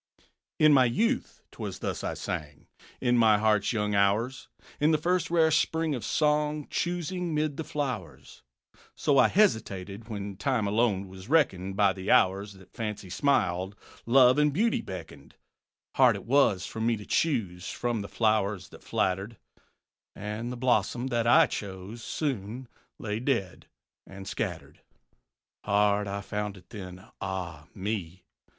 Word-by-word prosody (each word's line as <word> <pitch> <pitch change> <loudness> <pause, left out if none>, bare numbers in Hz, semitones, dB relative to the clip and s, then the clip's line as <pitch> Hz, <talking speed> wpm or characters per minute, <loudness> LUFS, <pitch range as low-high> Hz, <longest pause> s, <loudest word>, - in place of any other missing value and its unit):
"_ - - -30 0.4
_In 150 - +6
my 130 -2 +6
youth 230 - -1
'twas 100 -5 -6
thus - - -4
I - - -2
sang, 75 -1 -5 0.3
In 120 -1 +2
my 110 -2 +5
heart's 105 -1 +2
young 105 -3 -1
hours, 105 +6 +1 0.3
In 150 - +3
the 155 - +4
first 175 +2 0
rare 165 -2 +3
spring 160 0 +1
of 125 - -4
song, 150 -1 +1
Choosing 175 -1 -2
'mid 150 -1 0
the 160 - -4
flowers. 130 - -5 0.5
So 140 -2 +2
I - - +7
hesitated 110 - 0
when 100 -2 -5
Time 125 -2 0
alone 100 -2 +1
was 95 +3 -12
reckoned 95 - +2
By 100 -2 +4
the 95 +1 -6
hours 100 +2 +3
that 95 -1 -18
Fancy 105 -4 -5
smiled, 95 -6 +1 0.3
Love 130 +2 +6
and 150 0 +4
Beauty 220 +10 +1
beckoned. 80 -6 -9 0.6
Hard - - +5
it - - -8
was 115 -7 +3
for 110 - -6
me 115 0 +1
to 105 - -10
choose 100 - -1
From 120 -3 -2
the 100 - -7
flowers 105 -3 0
that - - -15
flattered; 95 +4 -1 0.8
And 105 +4 -5
the 125 - -5
blossom 120 0 +1
that 120 -2 0
I 120 - +7
chose 100 +3 -7
Soon 125 -4 -3 0.3
lay 105 0 -3
dead 115 -8 -2 0.4
and 95 0 -10
scattered. - - -5 0.8
Hard 105 0 +2
I 100 +1 -3
found 105 0 -4
it 90 - -19
then, 90 -3 -9 0.2
ah, 90 -6 -5
me! 95 -3 -4
110 Hz, 150 wpm, -28 LUFS, 95-135 Hz, 0.8 s, I